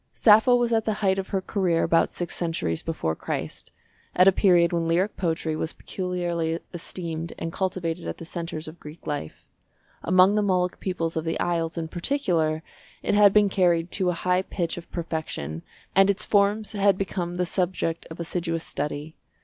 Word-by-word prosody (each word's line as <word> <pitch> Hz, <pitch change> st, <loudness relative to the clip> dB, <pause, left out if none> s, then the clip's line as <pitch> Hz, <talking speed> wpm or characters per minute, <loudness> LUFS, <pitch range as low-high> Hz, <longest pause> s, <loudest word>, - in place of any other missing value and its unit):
Sappho 220 Hz, +3 st, +6 dB
was 240 Hz, -1 st, +1 dB
at 225 Hz, -1 st, +2 dB
the 215 Hz, -, +1 dB
height 190 Hz, 0 st, +3 dB
of 190 Hz, -, -4 dB
her 195 Hz, -, -1 dB
career 180 Hz, -5 st, +1 dB
about 165 Hz, -, +3 dB
six 175 Hz, -1 st, -4 dB
centuries 160 Hz, -, -2 dB
before 80 Hz, -, -2 dB
Christ, -, -, -5 dB, 0.4 s
at 180 Hz, +1 st, +6 dB
a -, -, +9 dB
period 175 Hz, -3 st, +4 dB
when 165 Hz, -1 st, 0 dB
lyric 180 Hz, +5 st, +1 dB
poetry 160 Hz, -3 st, -1 dB
was 160 Hz, +1 st, -3 dB
peculiarly 175 Hz, -3 st, -2 dB
esteemed 165 Hz, -1 st, -5 dB
and 165 Hz, 0 st, -4 dB
cultivated 180 Hz, -3 st, -2 dB
at -, -, -4 dB
the 165 Hz, -, -9 dB
centres 165 Hz, -2 st, -5 dB
of 160 Hz, +2 st, -10 dB
Greek 150 Hz, +2 st, -12 dB
life. 145 Hz, -, -5 dB, 0.6 s
Among 185 Hz, +3 st, +5 dB
the 210 Hz, -, +2 dB
Molic 180 Hz, -3 st, +1 dB
peoples 170 Hz, -3 st, -2 dB
of 160 Hz, -, -1 dB
the 165 Hz, 0 st, -2 dB
Isles, 165 Hz, -2 st, -1 dB
in 165 Hz, -1 st, -2 dB
particular, 170 Hz, -, 0 dB, 0.4 s
it -, -, 0 dB
had 205 Hz, -1 st, +7 dB
been 210 Hz, 0 st, +5 dB
carried 175 Hz, -3 st, +2 dB
to 185 Hz, -2 st, +1 dB
a -, -, +1 dB
high 180 Hz, +2 st, +1 dB
pitch 175 Hz, -3 st, -3 dB
of 175 Hz, -, -10 dB
perfection, 160 Hz, -, -4 dB, 0.3 s
and 195 Hz, +1 st, +6 dB
its 200 Hz, -, +1 dB
forms 205 Hz, +1 st, +2 dB
had 200 Hz, -2 st, +3 dB
become 180 Hz, -3 st, -3 dB
the 180 Hz, 0 st, 0 dB
subject 175 Hz, -2 st, -1 dB
of 160 Hz, -, -9 dB
assiduous 170 Hz, -1 st, -2 dB
study. 150 Hz, +2 st, -4 dB
175 Hz, 180 wpm, -25 LUFS, 165-190 Hz, 0.6 s, a